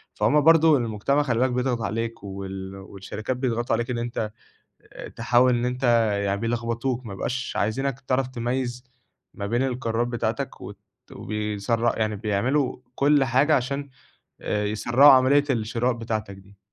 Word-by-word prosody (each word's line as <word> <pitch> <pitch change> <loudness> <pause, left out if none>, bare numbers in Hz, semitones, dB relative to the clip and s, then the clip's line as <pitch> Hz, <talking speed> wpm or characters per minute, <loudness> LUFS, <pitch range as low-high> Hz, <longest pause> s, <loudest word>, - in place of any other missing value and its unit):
فهُم 115 +9 +3
برضه 160 0 +6
المجتمع 120 +5 0
خلّي 120 -5 0
بالك 130 +1 +2
بيضغط 125 -1 -1
عليك 115 +2 -3
وال 95 -1 -7
والشركات 100 +5 -6
بيتضغطوا 120 -2 0
عليك 120 +2 -3
إن 120 - -2
أنت 120 -2 -3 0.6
آآ، - - -8
تحاول 120 +2 +2
إن 120 - -1
أنت 125 +1 -3 0.4
يعني 100 0 -1
بيلخبطوك 115 +2 -2
ما 105 - -6
يبقاش 130 +6 -3
عايزينك 135 +5 -1
تعرف 130 0 -1
تميّز 125 0 -3 0.5
ما 100 - -5
بين 120 +5 0
القرارات 120 -2 -1
بتاعتك، 120 -2 -3
وت - - -9 0.3
وبيسر 105 +2 -1
يعني 110 -1 0
بيعملوا 120 +7 0 0.2
كل 145 0 +3
حاجة 135 +5 +3
عشان 140 +2 -3 0.5
آآ، 105 0 -1
يسرّعوا 120 +7 +5
عملية 135 +2 +5
الشراء 115 +1 0
بتاعتك 110 -3 -4
دي. 95 +1 -18
120 Hz, 145 wpm, -24 LUFS, 110-130 Hz, 0.6 s, برضه